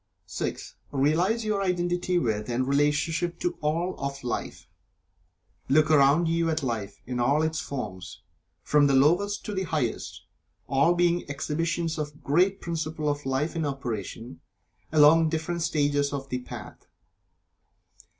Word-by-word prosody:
(6) - - -5
Realize 170 +11 +1
your 210 -2 0
identity 180 -1 0
with 110 -7 -1
and 125 +2 0
relationship 155 +5 +1
to 175 - -1
All 165 +5 0
of 140 0 -4
Life. 125 - -4 1.0
Look 155 +3 +4
around 150 +3 +5
you 165 0 +1
at 160 -2 -1
Life 110 -5 -3
in 125 0 -3
all 140 +6 +2
its 160 0 -1
forms, 95 -10 -6 0.4
from 145 -1 +4
the 140 - +3
lowest 175 +9 +2
to 210 - -4
the 190 - -1
highest, 155 -10 -3 0.4
all 140 +6 +3
being 175 0 +2
exhibitions 160 +3 -2
of 150 -1 -3
the - - -19
great 180 +8 +2
principle 160 -2 -3
of 145 -1 -3
Life 135 +6 -1
in 165 - -1
operation 120 - -5 0.5
along 155 +1 +6
different 165 +2 -2
stages 145 -3 +1
of 135 -1 -5
The 125 - -2
Path. 125 - -10
150 Hz, 140 wpm, -27 LUFS, 140-170 Hz, 1.0 s, along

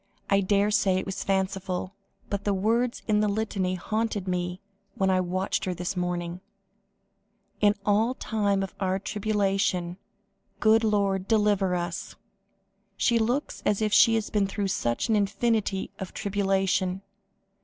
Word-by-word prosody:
"I 200 0 +5
daresay 200 -1 +2
it 190 - -2
was 195 0 -4
fanciful, 190 -1 -1 0.3
but 200 0 -3
the 205 -1 +1
words 230 +5 0
in 210 -1 +3
the 210 - +2
Litany 200 -3 -1
haunted 215 +1 -2
me 180 0 -2 0.4
when 190 -1 +2
I 185 0 +3
watched 185 +2 -1
her 185 -1 -2
this 180 +2 -3
morning: 175 0 -3 1.2
'In 205 0 +4
all 220 +5 +2
time 205 -4 0
of 190 - -6
our 190 -1 0
tribulation 195 -3 -1 0.6
Good 220 +1 +4
Lord, 200 -3 +1
deliver 205 -4 +2
us.' 175 0 -4 0.8
She 235 -1 +3
looks 245 +6 -1
as 205 - +1
if 215 -1 0
she 230 - +6
had 220 -1 -2
been 205 -2 +2
through 195 0 -2
such 120 -9 -1
an 225 - +2
infinity 205 -1 0
of 190 - -7
tribulation." 195 -1 0
195 Hz, 145 wpm, -27 LUFS, 185-210 Hz, 1.2 s, she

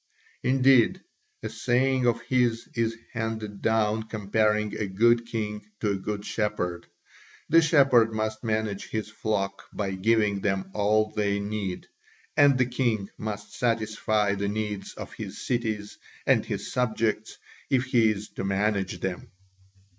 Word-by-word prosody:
Indeed, 135 +6 +4 0.4
a - - -3
saying 130 0 +1
of 115 0 +1
his 120 -3 +1
is 115 -1 0 0.2
handed 110 -3 -4
down 110 -1 +2
comparing 105 0 0
a 105 - -2
good 115 +4 +3
king 105 -2 -3 0.2
to 105 - +1
a - - 0
good 100 +1 -4
shepherd 90 -5 -2 0.6
the 165 +1 +7
shepherd 135 -8 +5
must 110 0 -3
manage 110 -3 -1
his 110 -1 -3
flock 105 -2 -3
by 100 -2 -2
giving 100 +1 +2
them 95 -1 -1
all 105 +1 +2
they 100 -1 0
need, 100 -2 -3 0.5
and 140 -2 +6
the 130 - +3
king 120 -5 -1
must 105 -1 -5
satisfy 110 -3 +1
the 100 0 -2
needs 105 -1 -3
of - - -8
his - - -7
cities 110 -4 -2 0.3
and - - +3
his - - -4
subjects 110 -3 -1 0.3
if 130 -2 +2
he 120 -4 +4
is 105 0 -3
to - - -6
manage 95 -2 0
them. 95 -2 -4
110 Hz, 140 wpm, -27 LUFS, 105-115 Hz, 0.6 s, the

